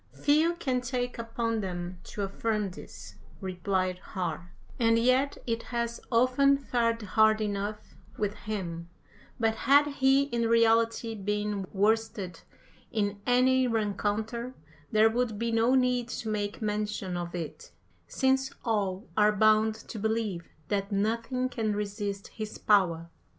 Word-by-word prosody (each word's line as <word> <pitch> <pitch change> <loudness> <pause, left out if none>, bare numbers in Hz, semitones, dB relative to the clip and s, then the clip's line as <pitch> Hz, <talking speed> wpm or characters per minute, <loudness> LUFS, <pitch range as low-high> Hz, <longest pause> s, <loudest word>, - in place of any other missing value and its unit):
"Few 315 +4 +3
can 260 -7 -1
take 245 -1 -3
upon 230 0 -2
them 180 -1 -5
to 205 - -5
affirm 210 0 -1
this," 180 - -11 0.2
replied 185 -1 -1
Har, 175 -2 -5 0.3
"and 230 -1 +4
yet 255 +4 +2
it 230 -1 -1
has 235 -1 -3
often 255 +4 +4
fared 230 -4 0
hard 215 +2 +4
enough 210 0 -3 0.2
with 205 -1 -1
him; 180 -6 -5 0.5
but 225 -1 +2
had 280 +6 +4
he 275 -1 +3
in 235 -4 -1
reality 230 0 +3
been 205 -1 -2
worsted 205 -3 0 0.5
in 205 -3 -1
any 255 +1 +4
rencounter 220 +2 -2 0.4
there 215 +1 +5
would 225 -1 0
be 230 +1 -1
no 230 +3 +3
need 250 -2 +2
to 230 -1 -5
make 205 0 -2
mention 210 -3 -2
of 175 0 -4
it, 165 -3 -6 0.4
since 265 0 +1 0.2
all 205 -3 -1
are 210 0 +5
bound 215 +1 +4
to 220 0 -9
believe 220 -5 -2 0.2
that 200 0 -1
nothing 230 +5 0
can 220 -4 -2
resist 205 -1 -4
his 215 -1 -6
power." 170 -5 +2
220 Hz, 135 wpm, -29 LUFS, 200-235 Hz, 0.5 s, there